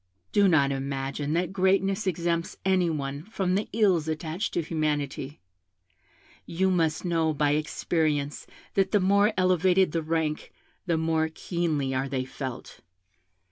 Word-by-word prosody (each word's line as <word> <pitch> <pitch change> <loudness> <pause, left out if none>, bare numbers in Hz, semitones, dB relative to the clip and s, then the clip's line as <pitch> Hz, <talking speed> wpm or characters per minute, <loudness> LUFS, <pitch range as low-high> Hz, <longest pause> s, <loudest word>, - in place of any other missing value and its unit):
Do 205 -1 +4
not 140 -6 +4
imagine 135 +2 -3
that 175 +2 -1
greatness 195 +1 +1
exempts 170 -1 -1
any 185 -2 +3
one 140 -2 -3
from 190 0 -2
the 200 +3 -1
ills 190 -7 +2
attached 160 +5 -3
to 170 - +1
humanity. 150 -3 -2 1.1
You 190 +3 +1
must 165 -2 0
know 165 -3 +1
by 145 0 +2
experience 150 -1 -1 0.3
that 195 0 +1
the 205 - +5
more 200 +3 +4
elevated 185 0 +3
the 165 - -1
rank 155 -1 -2 0.4
the 170 -2 +2
more 160 0 +1
keenly 160 -6 -2
are 130 +1 -1
they 130 -1 -2
felt. 130 -1 -7
165 Hz, 140 wpm, -27 LUFS, 150-185 Hz, 1.1 s, the